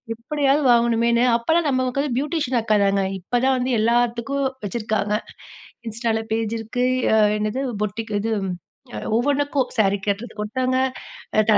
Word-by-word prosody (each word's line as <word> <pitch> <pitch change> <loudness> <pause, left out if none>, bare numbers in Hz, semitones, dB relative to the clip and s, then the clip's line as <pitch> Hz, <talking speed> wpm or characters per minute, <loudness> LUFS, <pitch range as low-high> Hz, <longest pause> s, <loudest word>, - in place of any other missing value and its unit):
எப்டியாவது 280 +4 +1
வாங்கணுமேன்னு 235 0 +3
அப்பலாம் 320 +7 +1
நமக்கு 255 0 0
வந்து 280 -4 -2
பியூட்டிஷியன் 285 -4 -1
அக்கா 215 -1 +2
தாங்க! 195 0 +2 0.2
இப்பதான் 250 +7 +1
வந்து 250 - -1
எல்லாத்துக்கும் 240 +4 +1 0.2
வச்சிருக்காங்க. 215 -1 -1 0.8
Instaல 225 0 -1
பேஜ் 225 -1 -1
இருக்கு. 245 +3 -2 0.3
அ - - +5 0.2
என்னது 215 +5 -2 0.2
பொட்டிக் 215 +2 -3
இதும், 210 -2 -1 0.5
அ - - -4 0.2
ஒவ்வொன்னுக்கும் 285 +1 +1
சாரி 200 -1 +3
கட்டுறதுக்கு 210 +1 -2
ஒருத்தவுங்க. 255 +4 0 0.7
தல 215 - +6
235 Hz, 130 wpm, -22 LUFS, 220-260 Hz, 0.8 s, தல